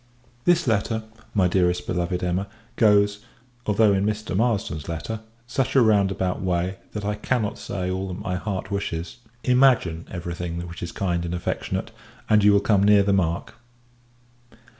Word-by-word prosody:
This 175 -1 +4
letter, 110 -1 0 0.3
my 95 -3 +4
dearest 90 -1 +1
beloved 90 0 -2
Emma, 90 +2 -1 0.3
goes 105 -1 +4 0.5
although 105 0 +4
in 95 0 +1
Mr. 105 -1 -2
Marsden's 100 - 0
letter 85 +7 -4 0.3
such 130 +2 -1
a 135 - +7
roundabout 95 -4 +2
way, 90 +1 -1 0.2
that 105 -1 -4
I 105 - 0
cannot 110 0 -1
say 90 -2 -3
all 95 +1 -2
that 90 -1 -5
my 95 -3 -3
heart 95 0 -4
wishes. 90 -4 -3 0.3
Imagine 125 -11 +3
every 85 -1 -5
thing 85 0 -4
which 85 - -9
is 85 - -4
kind 85 -3 -1
and 85 0 -3
affectionate, 90 - -3 0.4
and 105 -1 +4
you 105 - +7
will 100 0 +4
come 100 -1 +3
near 100 0 +6
the 100 0 +2
mark. 85 -3 0
100 Hz, 160 wpm, -24 LUFS, 90-105 Hz, 0.5 s, a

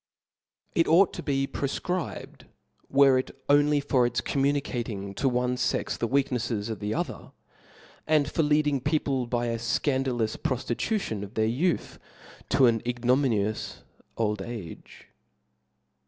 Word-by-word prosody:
It 165 - +2
ought 175 +4 +5
to - - -5
be 135 -2 0
pro 140 - -3
fcribed 180 +4 -4 0.4
were 135 -1 +5
it 130 - -4 0.2
only 145 +1 +4
for 135 -3 +2
its 120 - -1
communicating 120 -8 -1
to 135 +7 +1
one 125 0 0
fex 125 - -1
the 115 - -2
weaknefles 120 -5 0
of 110 - -5
the 105 0 -3
other, - - -4 0.7
and 150 -2 +3
for 160 - 0
leading 150 -2 +2
people 140 -3 0
by 120 0 -1
a 115 -1 -2
fcandalous 125 -1 0
proftitution 130 - -2
of 100 +2 -8
their 110 - +2
youth, 145 +10 -1 0.5
to 135 - +5
an 115 -2 +3
ignominious 120 -3 0 0.3
old 105 -3 0
age. 100 -5 -9
125 Hz, 135 wpm, -27 LUFS, 115-145 Hz, 0.7 s, ought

